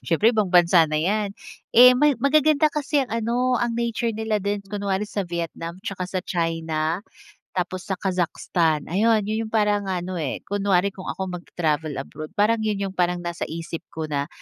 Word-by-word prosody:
siyempre 210 +8 +2
ibang 215 -4 +1
bansa 175 -2 +5
na 155 - -1
'yan. 200 +5 0 0.4
Eh 250 +1 +10
may 285 +2 +3
magaganda 305 +1 +3
kasi 290 -1 0
ang 245 - -11
ano 240 +2 +1
ang 240 -1 -1
nature 235 0 -1
nila 220 -1 -1
din 200 +1 -2
kunwari 200 0 -2
sa 210 -1 -4
Vietnam, 170 0 -4
'tsaka 185 -2 -4
sa 185 0 -2
China, 165 +1 -1 0.5
tapos 185 0 -3
sa 190 - -1
Kazakhstan. 170 -4 0
Ayun, 215 +4 +2
'yun 220 +2 -2
'yung - - -18
parang 210 -2 +1
ano 180 -1 -3
eh, 145 -5 -4
kunwari 200 -1 +1
kung 190 -1 -9
ako 190 +3 -3 0.2
magta-travel 155 -4 -2
abroad, 155 +3 -6
parang 215 +2 +3
'yun 210 -2 -1
'yung 190 -1 -5
parang 175 0 0
nasa 175 0 -4
isip 165 0 -5 0.2
ko 160 - -2
na, 145 -1 -2
195 Hz, 180 wpm, -23 LUFS, 170-220 Hz, 0.5 s, Eh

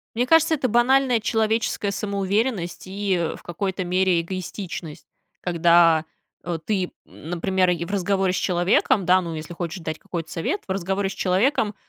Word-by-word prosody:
Мне 245 +2 +1
кажется, 325 +2 +4
это 270 -4 -1
банальная 245 +1 +3
человеческая 220 -1 0
самоуверенность 200 -1 -1
и 190 -3 -1
в - - -15
какой-то 190 +2 -3
мере 180 -1 +2
эгоистичность. 170 -3 -6 0.4
Когда, 170 -2 +4 0.4
э, 170 -1 -3
ты, 190 -4 -1
например, 180 +3 -1 0.2
в 170 - -7
разговоре 195 -1 +1
с - - -1
человеком, 180 +2 +2
да, 185 +1 +5
ну, 170 -2 -5
если 155 +2 -7
хочешь 175 +1 -5
дать 160 -1 -4
какой-то 165 -2 -6
совет, 370 - -2
в - - -4
разговоре 195 +1 -1
с - - -6
человеком, 205 +3 +1
190 Hz, 150 wpm, -23 LUFS, 175-205 Hz, 0.4 s, да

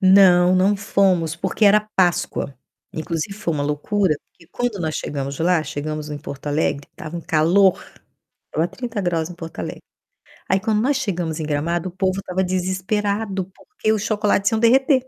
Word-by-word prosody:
Não, 185 -2 +6
não 195 +2 +3
fomos, 190 -5 +1
porque 210 +5 0
era 210 +1 +6 0.2
Páscoa. 175 -6 +1 0.4
Inclusive 165 +3 -3
foi 170 -6 -2
uma 145 - -1
loucura, 155 +5 +1 0.2
porque 165 - -21
quando 245 -6 -2
nós 155 -2 -2
chegamos 140 -1 -4
lá, 170 -1 +2
chegamos 155 0 -5
em 145 - -4
Porto 140 +1 -9
Alegre, 145 -1 0
estava 155 +3 -8
um 170 - -4
calor, 170 +5 +4 0.7
estava 165 +3 0
30º 185 -10 -2
em 175 - -9
Porto 165 -2 -8
Alegre. - - -5 0.7
Aí 190 - +3
quando 215 +1 +1
nós 275 +3 +2
chegamos 175 - -2
em - - -2
Gramado 165 +4 -1
o - - -12
povo 190 +1 -1
estava 190 0 -2
desesperado 190 +2 -1
porque 420 - -3
os 210 - -1
chocolates 210 -1 +1
iam 225 - +1
derreter 260 +3 +4
185 Hz, 165 wpm, -21 LUFS, 160-205 Hz, 0.7 s, Não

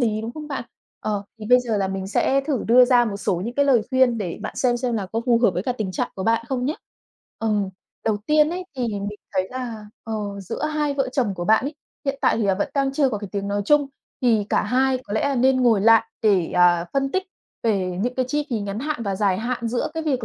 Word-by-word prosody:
lý, 215 -3 +1
đúng 225 +2 -5
không 300 +2 -8
bạn? 275 -4 -4 0.4
Ờ, 205 -2 -2 0.2
thì 215 - -7
bây 250 +2 +6
giờ 235 -3 -1
là 195 -1 0
mình 190 0 -4
sẽ 265 +7 +2
thử 275 -3 -2
đưa 250 +2 +7
ra 245 -1 +4
một 210 -4 -3
số 200 -2 -1
những 235 +2 -4
cái 285 - +3
lời 260 -5 +4
khuyên 260 -3 +3
để 180 -5 -4
bạn - - -5
xem 245 -2 +2
xem 240 -1 -1
là 205 -4 -2
có 225 - 0
phù 235 -2 +4
hợp 230 - +6
với 180 - -1
cả 250 - -1
tình 215 -6 -4
trạng - - -2
của 190 - -5
bạn 230 0 +2
không 255 -2 -1
nhá. 295 +4 0 0.6
Ừm, 210 -3 0 0.4
đầu 220 -2 +2
tiên 305 0 +4
ấy 365 +1 -4
thì 255 - -2
mình 205 0 -4
thấy 185 -1 0
là, 235 -4 -6 0.2
ờ, 225 - -5 0.3
giữa 190 - -4
hai 300 -2 0
vợ 270 -2 0
chồng 240 -8 0
của 175 -1 -4
bạn 220 +6 +4
ấy, 295 - -5 0.3
hiện 275 -1 -1
tại - - +3
thì 225 - 0
là 195 -2 +2
vẫn 205 +10 -1
đang 275 -1 +1
chưa 275 -1 +2
có 220 -5 -2
cái 205 -1 -7
tiếng 200 -1 -2
nói 205 0 -1
chung, 295 +4 +4 0.4
thì 225 -5 +3
cả - - +2
hai 255 +4 +2
có 205 - -8
lẽ 275 +6 +1
nên 260 +2 +4
ngồi 230 -5 +4
lại 225 +2 +6 0.2
để, 195 -6 +3
à, 175 -1 +4
phân 275 0 0
tích 380 - +1 0.4
về 190 -5 0
những 245 +4 -1
cái 255 - 0
chi 295 +2 -1
phí 230 -3 -1
ngắn 200 0 -4
hạn 295 -3 -3
và 200 -3 -1
dài 190 -2 +1
hạn 235 0 -2
giữa 240 +1 -1
cái 325 - -2
việc 265 -6 -1
230 Hz, 265 wpm, -23 LUFS, 205-265 Hz, 0.6 s, đưa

